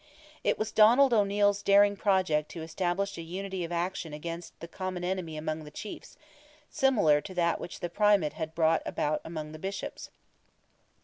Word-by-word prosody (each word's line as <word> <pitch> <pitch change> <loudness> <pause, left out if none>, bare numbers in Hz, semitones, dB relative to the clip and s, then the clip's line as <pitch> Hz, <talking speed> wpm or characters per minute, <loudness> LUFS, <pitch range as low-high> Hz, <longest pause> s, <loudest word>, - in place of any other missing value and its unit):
It - - +1
was 215 0 -2
Donald 240 +5 +6
O'Neil's 205 -1 +2
darling 200 0 +5
project 185 -7 +1
to 165 - -6
establish 175 +4 -2
a - - -4
unity 185 +2 -5
of 170 - -5
action 170 -2 -3
against 165 +3 -7
the 170 - -8
common 185 0 -5
enemy 180 -4 -3
among 155 0 -3
the 150 - -10
chiefs, 205 +7 -9 0.5
similar 205 - +3
to 185 - -9
that 170 -1 +1
which 175 - -8
the 175 - -1
Primate 205 -6 +3
had 160 -1 -5
brought 165 0 +3
about 150 +1 -1
among 155 -2 -6
the 155 - -9
Bishops. 195 +3 -5
175 Hz, 170 wpm, -29 LUFS, 160-200 Hz, 0.5 s, Donald